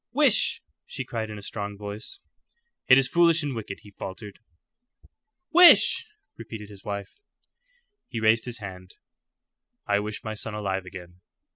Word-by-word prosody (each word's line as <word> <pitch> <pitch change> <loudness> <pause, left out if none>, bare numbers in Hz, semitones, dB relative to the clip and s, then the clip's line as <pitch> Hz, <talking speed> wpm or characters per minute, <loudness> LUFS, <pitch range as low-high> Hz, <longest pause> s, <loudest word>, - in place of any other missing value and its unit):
"Wish!" - - +3 0.2
she - - -6
cried, 110 -1 -4
in 105 - -7
a 100 - -10
strong 100 -1 -6
voice. 105 - -8 0.7
"It 130 - +8
is 135 -1 +3
foolish 170 -2 +3
and 145 -2 -3
wicked," 105 -4 -7
he 105 - -14
faltered. 100 +1 -9 1.1
"Wish!" 355 +5 +7 0.3
repeated 110 -2 -9
his 100 -2 -14
wife. 100 - -6 0.9
He 115 - -5
raised 110 +1 +3
his 120 -2 -4
hand. 95 -3 -10 0.9
"I 100 0 +1
wish 105 +1 -5
my 110 - -4
son 110 0 -5
alive 95 -3 -3
again." 90 0 -11
105 Hz, 145 wpm, -25 LUFS, 100-115 Hz, 1.1 s, It